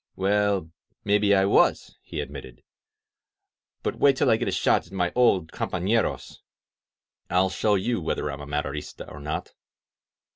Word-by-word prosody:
"Well, 100 Hz, -3 st, +1 dB, 0.3 s
maybe 100 Hz, 0 st, +3 dB
I 95 Hz, 0 st, +3 dB
was," 100 Hz, -, +2 dB
he -, -, -5 dB
admitted. 65 Hz, -3 st, -9 dB, 1.2 s
"But -, -, -3 dB
wait 140 Hz, -2 st, +4 dB
till 130 Hz, -, +3 dB
I 110 Hz, -, +4 dB
get -, -, -3 dB
a -, -, 0 dB
shot -, -, +1 dB
at -, -, -20 dB
my 90 Hz, -2 st, -1 dB
old 95 Hz, -10 st, +3 dB
companeros. 100 Hz, +5 st, -1 dB, 0.9 s
I'll 90 Hz, +1 st, +2 dB
show 105 Hz, +2 st, +1 dB
you 110 Hz, +2 st, -1 dB
whether 80 Hz, -, -2 dB
I'm 70 Hz, -, -7 dB
a 70 Hz, -, -8 dB
Maderista 75 Hz, 0 st, -4 dB
or 75 Hz, -, -10 dB
not 75 Hz, +2 st, -5 dB
95 Hz, 150 wpm, -25 LUFS, 75-105 Hz, 1.2 s, wait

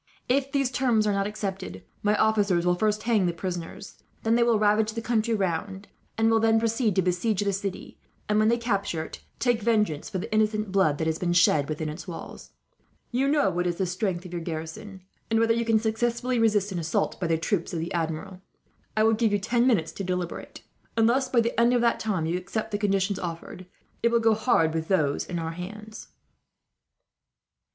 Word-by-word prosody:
"If 275 Hz, +2 st, +1 dB
these 275 Hz, -3 st, +1 dB
terms 245 Hz, -4 st, +2 dB
are 210 Hz, -, +2 dB
not 200 Hz, 0 st, 0 dB
accepted, 195 Hz, -2 st, -5 dB, 0.2 s
my 210 Hz, 0 st, +2 dB
officers 205 Hz, -5 st, +2 dB
will 180 Hz, -, +4 dB
first 210 Hz, +3 st, 0 dB
hang 220 Hz, -6 st, +2 dB
the 175 Hz, -, 0 dB
prisoners, 180 Hz, +2 st, -6 dB, 0.2 s
then 225 Hz, -, +2 dB
they 235 Hz, -, +3 dB
will 235 Hz, -2 st, +4 dB
ravage 210 Hz, +1 st, +2 dB
the 230 Hz, -, -3 dB
country 230 Hz, -1 st, +1 dB
round; 190 Hz, +1 st, -3 dB, 0.3 s
and 225 Hz, 0 st, +3 dB
will 225 Hz, -, +4 dB
then 225 Hz, 0 st, +3 dB
proceed 225 Hz, -2 st, 0 dB
to 190 Hz, -, +3 dB
besiege 185 Hz, +4 st, 0 dB
the 200 Hz, -1 st, 0 dB
city 195 Hz, 0 st, -5 dB, 0.3 s
and, 210 Hz, 0 st, +2 dB
when 215 Hz, -, +4 dB
they 235 Hz, +1 st, +3 dB
capture 200 Hz, -8 st, -1 dB
it, -, -, -10 dB, 0.2 s
take 240 Hz, -3 st, +1 dB
vengeance 210 Hz, -9 st, +1 dB
for 195 Hz, -, -3 dB
the 200 Hz, +4 st, -5 dB
innocent 215 Hz, -1 st, +1 dB
blood 185 Hz, -7 st, +2 dB
that 160 Hz, -, -2 dB
has 160 Hz, 0 st, -1 dB
been 175 Hz, -1 st, 0 dB
shed 155 Hz, -4 st, +4 dB
within 155 Hz, 0 st, -3 dB
its 155 Hz, +2 st, -7 dB
walls. 170 Hz, -, -8 dB, 0.6 s
You 260 Hz, +3 st, +1 dB
best 280 Hz, -, +2 dB
know 290 Hz, -10 st, +3 dB
what 175 Hz, 0 st, -1 dB
is 175 Hz, -, -1 dB
the 190 Hz, -, -1 dB
strength 180 Hz, 0 st, -2 dB
of 180 Hz, -, -9 dB
your 170 Hz, -, -3 dB
garrison, 165 Hz, +4 st, -7 dB, 0.3 s
and 225 Hz, 0 st, +2 dB
whether 230 Hz, 0 st, +3 dB
you 235 Hz, 0 st, 0 dB
can 225 Hz, -1 st, +3 dB
successfully 235 Hz, +3 st, 0 dB
resist 210 Hz, -3 st, +2 dB
an 180 Hz, -, -2 dB
assault 165 Hz, -1 st, -1 dB
by 180 Hz, -, -1 dB
the 165 Hz, 0 st, +2 dB
troops 170 Hz, +2 st, -1 dB
of 170 Hz, -, -3 dB
the 165 Hz, +2 st, -4 dB
Admiral. 165 Hz, +2 st, -3 dB, 0.6 s
"I 215 Hz, -, +4 dB
will 225 Hz, 0 st, +4 dB
give 225 Hz, -1 st, +1 dB
you 205 Hz, -, +3 dB
ten 235 Hz, +5 st, +1 dB
minutes 190 Hz, -11 st, +2 dB
to 195 Hz, -, -6 dB
deliberate. 180 Hz, -2 st, -4 dB, 0.3 s
Unless 245 Hz, +4 st, +3 dB
by 245 Hz, -2 st, +3 dB
the 230 Hz, 0 st, -1 dB
end 240 Hz, +1 st, +4 dB
of 240 Hz, -, +2 dB
that 235 Hz, -1 st, +2 dB
time 190 Hz, -7 st, -1 dB
you 170 Hz, +3 st, -1 dB
accept 220 Hz, +4 st, -4 dB
the 205 Hz, -, -1 dB
conditions 195 Hz, -1 st, 0 dB
offered, 175 Hz, +1 st, -7 dB, 0.3 s
it 235 Hz, -, +3 dB
will 235 Hz, 0 st, +3 dB
go 225 Hz, -1 st, +4 dB
hard 210 Hz, -8 st, +2 dB
with 160 Hz, 0 st, -2 dB
those 150 Hz, -7 st, +1 dB
in 175 Hz, -, -4 dB
our 165 Hz, -1 st, -3 dB
hands." 210 Hz, +5 st, -8 dB
205 Hz, 215 wpm, -26 LUFS, 175-225 Hz, 0.6 s, will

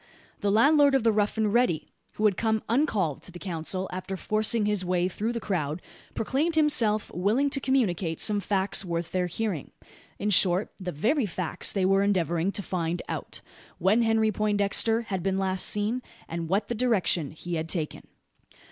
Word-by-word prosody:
The 205 Hz, -, 0 dB
landlord 280 Hz, +5 st, +5 dB
of 265 Hz, -, +2 dB
the 230 Hz, -, +4 dB
Rough 210 Hz, 0 st, 0 dB
and 215 Hz, -2 st, +1 dB
Ready, 240 Hz, -10 st, +2 dB, 0.3 s
who 215 Hz, -, -1 dB
had 205 Hz, -3 st, +4 dB
come 220 Hz, 0 st, 0 dB
uncalled 220 Hz, -, 0 dB
to -, -, -10 dB
the 175 Hz, -, -9 dB
council, 185 Hz, +1 st, -3 dB
after 185 Hz, +1 st, -5 dB
forcing 215 Hz, +3 st, 0 dB
his 210 Hz, -2 st, +1 dB
way 180 Hz, 0 st, +1 dB
through 210 Hz, +5 st, -3 dB
the 235 Hz, -, -3 dB
crowd, 165 Hz, -7 st, -2 dB, 0.4 s
proclaimed 295 Hz, +9 st, 0 dB
himself 230 Hz, -9 st, +3 dB
willing 220 Hz, +11 st, +1 dB
to 275 Hz, -, 0 dB
communicate 195 Hz, -, 0 dB
some 210 Hz, -2 st, +2 dB
facts 200 Hz, 0 st, 0 dB
worth 170 Hz, -2 st, -3 dB
their 180 Hz, -1 st, 0 dB
hearing 180 Hz, -4 st, -3 dB, 0.5 s
in 210 Hz, +2 st, -1 dB
short, 185 Hz, +1 st, +4 dB
the 185 Hz, -2 st, -4 dB
very 225 Hz, -, +1 dB
facts 180 Hz, -2 st, -2 dB
they 195 Hz, -2 st, 0 dB
were 195 Hz, +1 st, +3 dB
endeavouring 180 Hz, -2 st, +1 dB
to 200 Hz, -, -2 dB
find 170 Hz, -1 st, -2 dB
out: -, -, -5 dB, 0.4 s
when 195 Hz, +6 st, +3 dB
Henry 225 Hz, -1 st, +2 dB
Poindexter 210 Hz, +2 st, +1 dB
had 190 Hz, -5 st, -3 dB
been 190 Hz, +1 st, 0 dB
last 190 Hz, -1 st, 0 dB
seen, 215 Hz, +4 st, -1 dB, 0.3 s
and 165 Hz, -1 st, -5 dB
what 195 Hz, +4 st, +1 dB
the -, -, -2 dB
direction 215 Hz, -, +1 dB
he 175 Hz, +3 st, -7 dB
had 160 Hz, 0 st, -2 dB
taken. 160 Hz, -4 st, -3 dB
200 Hz, 180 wpm, -27 LUFS, 180-225 Hz, 0.5 s, landlord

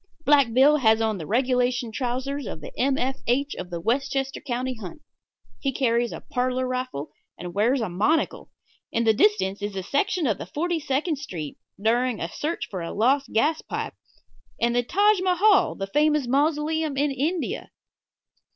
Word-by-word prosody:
Black 280 Hz, -5 st, +5 dB
Bill 275 Hz, +5 st, +5 dB
has 220 Hz, -5 st, +4 dB
on 220 Hz, -3 st, 0 dB
the 155 Hz, -, -6 dB
regulation 250 Hz, 0 st, +1 dB
trousers 260 Hz, +3 st, -3 dB
of -, -, -6 dB
the 150 Hz, -, -9 dB
M. 270 Hz, +1 st, +1 dB
F. 265 Hz, +2 st, -1 dB
H. 280 Hz, +4 st, +1 dB
of 180 Hz, -, -7 dB
the 170 Hz, -1 st, -4 dB
Westchester 270 Hz, +6 st, -1 dB
County 255 Hz, 0 st, -2 dB
Hunt. 225 Hz, -, -9 dB, 0.6 s
He 275 Hz, -, -1 dB
carries 240 Hz, -2 st, +1 dB
a -, -, -7 dB
parlor 255 Hz, +1 st, 0 dB
rifle, 255 Hz, -, -4 dB, 0.3 s
and 175 Hz, 0 st, -7 dB
wears 235 Hz, +6 st, +2 dB
a 225 Hz, -, -1 dB
monocle. 210 Hz, -, 0 dB, 0.4 s
In 230 Hz, -, +1 dB
the 220 Hz, -1 st, +4 dB
distance 200 Hz, -2 st, +2 dB
is 205 Hz, -1 st, -4 dB
a 190 Hz, -, -3 dB
section 345 Hz, -, 0 dB
of 215 Hz, -6 st, 0 dB, 0.2 s
Forty 340 Hz, +2 st, 0 dB
second 295 Hz, +2 st, -1 dB
Street 170 Hz, -, -6 dB, 0.2 s
during 235 Hz, +2 st, +1 dB
a 165 Hz, -, -2 dB
search 310 Hz, -, -3 dB
for 185 Hz, -3 st, -4 dB
a 165 Hz, -, -4 dB
lost 270 Hz, +6 st, +2 dB
gas 300 Hz, +8 st, +2 dB
pipe, -, -, -4 dB, 0.7 s
and 235 Hz, +1 st, +1 dB
the 245 Hz, -, +4 dB
Taj 400 Hz, -, +3 dB
Mahal, 375 Hz, +1 st, +4 dB
the 195 Hz, -, -3 dB
famous 300 Hz, +6 st, +2 dB
mausoleum 300 Hz, +2 st, 0 dB
in 290 Hz, +1 st, +2 dB
India. 310 Hz, +6 st, -2 dB
255 Hz, 170 wpm, -25 LUFS, 220-290 Hz, 0.7 s, Black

